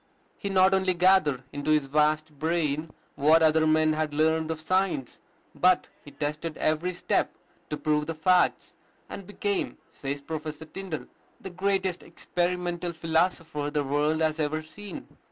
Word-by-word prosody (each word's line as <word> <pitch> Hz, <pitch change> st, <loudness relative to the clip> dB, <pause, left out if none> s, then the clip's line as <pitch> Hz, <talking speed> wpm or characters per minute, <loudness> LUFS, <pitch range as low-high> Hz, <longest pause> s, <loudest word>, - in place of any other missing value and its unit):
He 200 Hz, -, -4 dB
not 190 Hz, 0 st, +4 dB
only 190 Hz, -1 st, +2 dB
gathered 170 Hz, -7 st, +3 dB
into 145 Hz, +1 st, -3 dB
his 150 Hz, -2 st, +3 dB
vast 150 Hz, +1 st, +1 dB
brain 160 Hz, -1 st, 0 dB, 0.2 s
what 155 Hz, +3 st, +4 dB
other 155 Hz, 0 st, +4 dB
men 155 Hz, 0 st, +3 dB
had 155 Hz, -1 st, -2 dB
learned 160 Hz, +1 st, +2 dB
of 160 Hz, -1 st, -3 dB
science, 170 Hz, -5 st, -1 dB, 0.3 s
but 185 Hz, 0 st, +3 dB
he -, -, -11 dB
tested 150 Hz, +3 st, -4 dB
every 155 Hz, +4 st, 0 dB
step 180 Hz, -, -1 dB, 0.3 s
to 150 Hz, -, -3 dB
prove 150 Hz, 0 st, 0 dB
the 165 Hz, -, -3 dB
facts, 180 Hz, +3 st, +2 dB, 0.3 s
and 195 Hz, -, -8 dB
became, 205 Hz, -1 st, -2 dB
says 140 Hz, +1 st, -4 dB
Professor 155 Hz, +1 st, -6 dB
Tyndall, 180 Hz, -1 st, -6 dB, 0.3 s
"the 190 Hz, -, -8 dB
greatest 190 Hz, 0 st, 0 dB
experimental 175 Hz, -1 st, -2 dB
philosopher 160 Hz, -2 st, 0 dB
the 145 Hz, 0 st, 0 dB
world 150 Hz, +3 st, +1 dB
has 155 Hz, 0 st, 0 dB
ever 155 Hz, +1 st, -1 dB
seen." 205 Hz, +6 st, -9 dB
160 Hz, 150 wpm, -27 LUFS, 150-180 Hz, 0.3 s, not